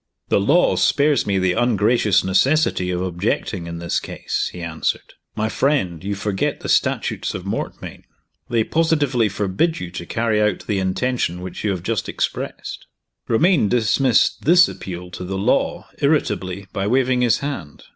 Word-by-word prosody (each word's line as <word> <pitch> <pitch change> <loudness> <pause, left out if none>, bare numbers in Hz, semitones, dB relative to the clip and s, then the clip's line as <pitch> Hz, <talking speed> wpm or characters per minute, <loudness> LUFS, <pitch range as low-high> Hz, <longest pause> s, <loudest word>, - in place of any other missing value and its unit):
"The - - +3
law 150 - +3
spares 145 -5 +2
me 100 -1 +1
the 95 -1 +2
ungracious 110 -2 +2
necessity 95 - +2
of 90 0 -1
objecting, 90 0 -2
in 85 0 -6
this 85 0 -1
case," - - -3
he 90 - -9
answered. 80 -2 -3 0.2
"My 110 0 0
friend, 110 - 0
you 100 +1 -2
forget 100 -1 -2
the - - -5
Statutes - - 0
of - - -6
Mortmain. - - -5 0.4
They 115 -2 +2
positively 145 -7 +1
forbid 100 - 0
you 90 -1 -6
to 85 -1 -7
carry 110 -2 0
out 105 -2 0
the 105 -3 -1
intention 95 -1 -1
which 90 0 -7
you 105 - +1
have 90 -3 -2
just 115 +2 -2
expressed." - - -4 0.4
Romayne 145 - +3
dismissed 120 +3 +2
this 175 +3 +6
appeal 90 -1 -7
to 90 - -7
the 95 +1 -4
law 95 - 0
irritably, 100 - 0
by 100 0 -1
waving 125 +1 +2
his 120 -3 +3
hand. 130 - -6
105 Hz, 160 wpm, -21 LUFS, 95-125 Hz, 0.4 s, this